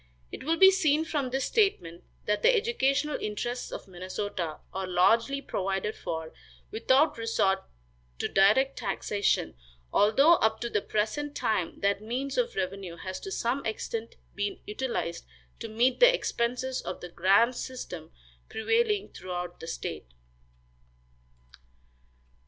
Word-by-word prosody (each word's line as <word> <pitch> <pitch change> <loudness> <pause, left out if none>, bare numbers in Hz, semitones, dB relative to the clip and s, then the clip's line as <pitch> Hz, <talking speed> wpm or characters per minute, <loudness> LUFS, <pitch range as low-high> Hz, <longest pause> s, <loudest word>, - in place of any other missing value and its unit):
It - - -7
will 325 +4 +1
be 385 +1 +9
seen 320 -5 +2
from 285 -5 -1
this 265 +1 -1
statement 180 - +1 0.2
that 210 0 0
the - - +6
educational 300 - +1
interests 240 +4 -3
of - - -7
Minnesota 185 -2 -4 0.2
are 190 0 -3
largely 230 +10 +3
provided 195 +2 -2
for 160 -1 -5 0.4
without 260 +5 +3
resort 205 -4 +1 0.6
to - - -1
direct 215 +8 +3
taxation, 205 -1 0 0.4
although 275 +11 +5
up 220 0 +1
to 235 -1 -3
the 205 - +1
present 220 +10 -2
time 190 -6 -1
that 200 0 +1
means 255 +5 -3
of 485 -1 0
revenue 185 -2 -3
has 185 +2 -6
to 390 - -7
some 255 -4 -1
extent 225 +1 -4 0.2
been 205 0 -3
utilized 210 -6 -3 0.4
to - - -5
meet 240 +4 +2
the - - +8
expenses 255 - -1
of - - -6
the 180 - -7
grand 195 +8 +4
system 180 -13 -7 0.4
prevailing 420 - +1
throughout 180 -1 -6
the 165 - -8
state. 80 - -5
225 Hz, 135 wpm, -28 LUFS, 190-275 Hz, 0.6 s, be